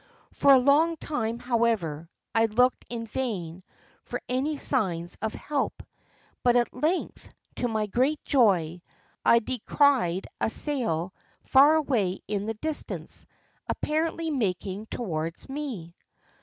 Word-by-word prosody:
For 280 - +5
a - - +8
long 305 +6 +4
time, 230 -7 -2
however, 225 -11 0 0.2
I 225 0 +4
looked 250 +4 +2
in 230 -1 -4
vain 190 -8 -4 0.4
for - - -4
any 275 +4 -1
signs 180 - -1
of 220 0 -2
help; 290 -2 -2 0.6
but 245 -1 +3
at 240 -1 +2
length, 335 +5 -2 0.3
to 245 - 0
my 220 -2 0
great 260 +9 +1
joy, 180 - +3 0.4
I 235 - +6
descried 235 - +2
a - - +1
sail 220 - -1 0.3
far 285 +4 +6
away 230 -12 +1
in 205 0 -2
the 225 - -2
distance, 310 +7 -4 0.4
apparently 320 +1 -1
making 200 - -2
towards 165 -8 -4
me. 265 - -5
235 Hz, 125 wpm, -27 LUFS, 190-280 Hz, 0.6 s, a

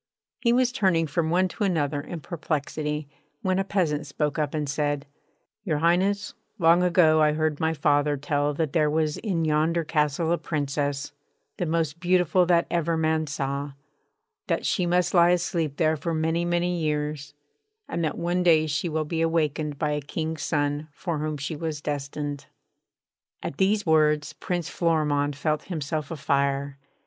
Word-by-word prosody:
He 235 - +2
was 250 0 +3
turning 185 -8 +2
from 160 +1 -1
one 185 +3 +3
to 210 - -4
another 150 -7 0
in 165 +2 -7
perplexity, 150 -2 -3 0.4
when 185 0 +1
a - - +2
peasant 155 -7 -1
spoke 150 +2 -2
up 150 0 -1
and 150 -1 -1
said: 145 0 -1 0.6
'Your 165 -8 0
Highness, 185 +5 +1 0.2
long 170 0 +5
ago 165 -3 +4
I 150 0 +4
heard 155 -1 0
my 160 0 +1
father 145 -1 +2
tell 145 +1 0
that 155 -2 -1
there 155 -3 +3
was 155 0 0
in 175 -7 -1
yonder 160 +2 +2
castle 150 +1 0
a 170 - +1
Princess, 145 -1 -2 0.5
the 175 - -1
most 160 -1 -1
beautiful 180 0 +3
that 170 -1 +4
ever 170 -1 +1
man 160 0 +1
saw; 140 -1 -3 0.7
that - - -1
she 180 -3 +1
must 180 +1 +2
lie 175 -1 +6
asleep 170 -4 0
there 160 -1 +3
for 160 +2 -3
many, 160 +2 0
many 175 0 0
years; 150 -2 -2 0.5
and 170 - -2
that 155 - -1
one 175 +1 0
day 160 -3 +5
she 145 +3 -1
will 155 0 -1
be 165 +1 -2
awakened 155 -2 0
by 150 0 0
a 150 0 -1
King's 160 +2 -4
son, 145 0 -1
for 165 0 -3
whom 155 0 -2
she 145 +3 -4
was 155 -1 -4
destined.' 145 -1 -4 1.0
At 140 - -5
these 205 +2 +2
words 150 -2 +3
Prince 175 -3 -3
Florimond 150 -5 +1
felt 150 +1 -1
himself 155 -3 -3
a 165 - -5
fire. 140 0 0
155 Hz, 170 wpm, -26 LUFS, 145-170 Hz, 1.0 s, lie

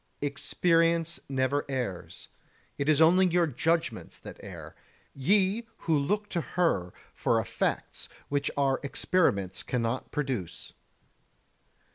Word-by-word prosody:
33. 145 - +1
Experience 165 +3 +1
never 135 +1 +1
errs; 125 -10 -4 0.5
it 140 +2 0
is 155 -1 +4
only 180 +4 +6
your 175 0 +3
judgements 160 -2 -1
that - - -11
err, - - -9 0.4
ye 200 - +2
who 165 - 0
look 205 +9 0
to 170 - -1
her 130 - 0 0.2
for - - +1
effects - - -2 0.2
which 140 -1 0
our 135 -2 +2
experiments 135 - +1
cannot 120 0 -2
produce. 130 - -4
145 Hz, 115 wpm, -29 LUFS, 130-170 Hz, 0.5 s, only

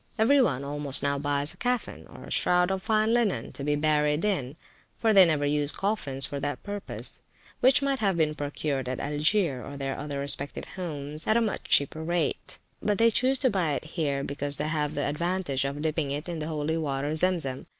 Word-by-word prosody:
Every 265 +6 +5
one 140 - +1
almost 140 -1 +2
now 140 0 0
buys 145 +1 +1
a - - -17
caffin, 250 0 -2
or - - -12
shroud 180 +1 +2
of 190 0 -2
fine 220 +2 +2
linen, 235 -5 0
to 140 - -7
be 145 +1 +1
buried 150 +2 +1
in 145 -10 -1 0.4
(for 225 -2 +2
they 195 -2 +9
never 155 -3 +1
use 145 0 +2
coffins 145 -10 0
for 140 - -5
that 145 -2 -4
purpose), 205 0 -4 0.4
which 260 +2 +4
might 275 -1 0
have 195 -5 +1
been 155 -2 +2
procured 145 -3 -3
at 130 - -3
Algier, 150 -1 +1
or 140 0 -8
their 135 -1 -3
other 145 0 -5
respective 140 0 -3
homes, 150 -4 -6
at 215 - +4
a - - +4
much 225 -3 -2
cheaper 150 +3 +2
rate; 170 -2 -2 0.2
but 210 -1 0
they 230 +2 +5
choose 260 +4 +2
to 260 -1 +2
buy 175 -7 0
it 140 - -3
here, 140 -5 -1
because 145 0 -2
they 155 - -2
have 150 -1 -1
the 145 - 0
advantage 150 -3 -1
of 140 +1 -3
dipping 155 -2 -1
it 145 +4 -4
in 170 -2 -4
the 155 - -4
holy 155 0 -1
water, 145 -1 -2
Zem 180 +3 +3
Zem. 135 -5 -5
150 Hz, 210 wpm, -27 LUFS, 140-190 Hz, 0.4 s, they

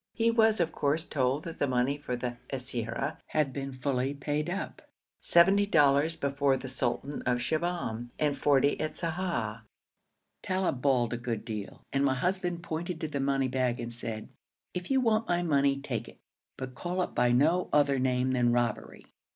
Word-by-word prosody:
He 230 0 +3
was, 220 -2 +4
of 165 -2 +1
course, 150 +3 0
told 135 0 0
that 165 -2 -7
the 145 - +2
money 130 +2 +1
for 145 -4 -4
the 120 0 -4
siyara 125 +1 -3
had 150 -4 0
been 135 -1 -4
fully 130 +1 -1
paid 150 +3 -2
up, 195 +3 -4 0.4
seventy 195 +4 +5
dollars 150 -2 +4
before 140 -2 +1
the 130 - -7
sultan 130 +2 -2
of 125 -1 +3
Shibahm, 125 -5 -2
and 150 -2 +1
forty 140 0 +3
at 155 - -3
Sa'ah. 160 -11 -2 0.8
Talib 185 -9 -1
bawled 125 -4 +2
a - - -1
good 115 -3 -4
deal, 105 -3 -6
and 140 0 +2
my 135 -1 +3
husband 175 +3 -1
pointed 170 +1 -4
to 160 - -1
the 145 -2 -3
money 135 -1 +1
bag 125 -2 0
and 120 0 -5
said, 115 -2 -6 0.4
'If 180 0 -5
you 265 -1 +3
want 225 -2 +1
all 175 - +3
my 175 - 0
money, 140 -4 +2
take 120 -5 -4
it; - - -16 0.4
but 130 -1 -6
call 180 +6 -2
it - - -5
by 120 0 +3
no 160 +9 +3
other 140 -2 +3
name 130 0 +1
than 120 -2 +3
robbery. 120 -2 -1
140 Hz, 185 wpm, -29 LUFS, 125-165 Hz, 0.8 s, seventy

